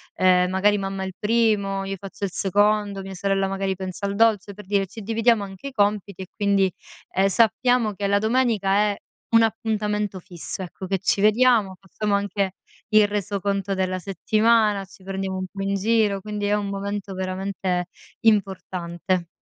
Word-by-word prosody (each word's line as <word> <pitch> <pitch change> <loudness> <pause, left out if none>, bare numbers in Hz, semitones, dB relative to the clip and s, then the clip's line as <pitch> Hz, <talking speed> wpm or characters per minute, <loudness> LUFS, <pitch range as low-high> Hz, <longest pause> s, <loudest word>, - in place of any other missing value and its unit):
ehm, 180 -1 +4
magari 205 +2 +3
mamma 195 0 -3
il 190 - -6
primo, 210 -3 +1
io 195 0 -3
faccio 195 +1 -10
il 190 - -4
secondo, 205 +1 +1
mia 195 - -7
sorella 195 +1 0
magari 195 0 -2
pensa 190 +2 -5
al 200 - -3
dolce, 210 -2 +2
per 210 -1 -11
dire 200 0 +1
ci 220 - -10
dividiamo 225 +1 +2
anche 195 +7 -9
i - - -6
compiti 205 -4 0
e - - -11
quindi, 200 -2 +2 0.5
ehm, 195 +1 +4
sappiamo 225 +2 +2
che 200 +1 -4
la 200 0 +3
domenica 220 -3 +1 0.2
è 200 - -3 0.4
un 230 - +7
appuntamento 210 -3 -1
fisso, 180 0 -8
ecco, 185 +1 -7
che 195 0 0
ci 200 - +1
vediamo, 215 -2 +4
facciamo 200 +1 -2
anche 200 -1 -1 0.4
il 215 -1 +6
resoconto 200 -1 -2
della 185 -1 -1
settimana, 215 +1 +2
ci 190 0 -18
prendiamo 190 0 -3
un 185 - -3
po' 200 - -6
in 195 0 -1
giro, 210 -1 +2
quindi 210 0 -4
è 205 - +1
un 205 -1 -2
momento 200 0 -4
veramente 185 -1 -2 0.3
importante. 185 -4 0
200 Hz, 170 wpm, -23 LUFS, 190-210 Hz, 0.5 s, un